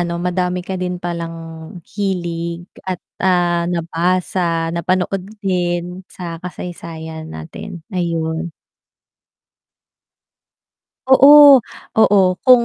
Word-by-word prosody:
ano 170 -1 -2
madami 180 0 -1
ka 190 - -5
din 180 0 -2
palang 170 -1 -5 0.6
hilig, 175 -4 -3 0.2
at, 185 -1 -3 0.2
ah, 175 -2 +2
nabasa, 170 0 -1
napanood 185 +2 0 0.2
din, 180 -1 -1
sa 170 -2 -7
kasaysayan 160 -3 -7
natin, 160 - -9
ayun. 165 -1 -2 2.6
Oo, 280 -1 +9 0.3
oo. 205 -2 +5 0.2
Kung 250 -2 +6
175 Hz, 85 wpm, -18 LUFS, 170-185 Hz, 2.6 s, Oo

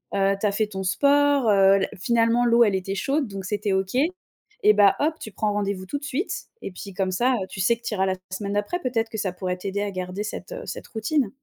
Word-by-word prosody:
heu, 195 0 +2
tu 210 - -1
as - - +1
fait 215 +1 +1
ton 190 -2 -5
sport, 280 +4 +3
heu, 195 -1 +5
la - - 0
finalement, 235 +3 +2
l'eau, 235 0 +5
elle 205 -4 +2
était 190 +1 -3
chaude, 275 +6 0
donc 195 -2 -7
c'était 205 +1 -1
OK. 190 +4 -1 0.7
Et 210 - +7
bah, 200 -2 +5
hop, 310 +2 +1
tu 215 - -8
prends 215 -1 0
rendez-vous 200 -2 -2
tout 285 +9 -4
de 285 - -8
suite 295 +7 -2 0.3
et - - -6
puis 195 +2 -9
comme 190 0 -1
ça, 245 +8 +2
heu, 195 -6 -1
tu - - -8
sais 235 +6 +3
que 235 - -29
tu - - -2
iras 190 - +1
la 190 - 0 0.2
semaine 200 +1 -3
d'après, 205 +13 -1
peut-être 230 -7 -1
que 220 - -6
ça 195 -4 -2
pourrait 180 0 -3
t'aider 195 +2 -3
à 205 0 -2
garder 185 +2 -4
cette, 215 - -6
heu, - - -6
cette - - -7
routine? 225 +2 0
205 Hz, 255 wpm, -24 LUFS, 195-240 Hz, 0.7 s, Et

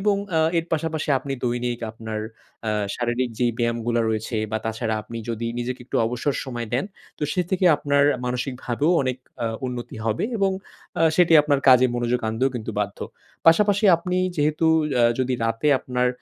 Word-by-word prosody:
এবং 205 0 +2
অ্যা 160 -2 +2 0.2
এর 165 - -1
পাশাপাশি 160 -1 -1
আপনি 140 - -5
দৈনিক 120 0 -1
আপনার 110 -1 -6 0.4
অ্যা 110 - 0 0.2
শারীরিক 120 +1 -1
যেই 120 -1 +2
ব্যায়ামগুলা 115 0 0
রয়েছে, 110 +1 -2
বা 110 - 0
তাছাড়া 110 0 -2
আপনি 115 +2 -7
যদি 115 0 -3
নিজেকে 125 +1 -3
একটু - - -2
অবসর 125 +4 -1
সময় 120 -4 -5
দেন, 130 - +1 0.3
তো - - -7
সে 185 - +1
থেকে 190 -1 +1
আপনার 140 0 +2 0.2
মানসিকভাবেও 125 +3 -1
অনেক 130 -1 -2 0.2
অ্যা 115 - -1 0.2
উন্নতি 125 -2 -6
হবে 110 0 0
এবং 195 -2 +2 0.5
আ - - +4
সেটি 175 -2 +4
আপনার 145 -2 +1
কাজে 130 0 +7
মনোযোগ 120 0 0
আনতেও 125 +5 0
কিন্তু 115 -2 -4
বাধ্য। 100 -1 -3 0.5
পাশাপাশি 205 +5 +5
আপনি 180 +2 -3 0.2
যেহেতু 150 +2 +1 0.3
অ্যা 120 -1 +4
যদি 130 0 0
রাতে 115 +6 0
আপনার 125 -1 0
125 Hz, 170 wpm, -23 LUFS, 115-145 Hz, 0.5 s, কাজে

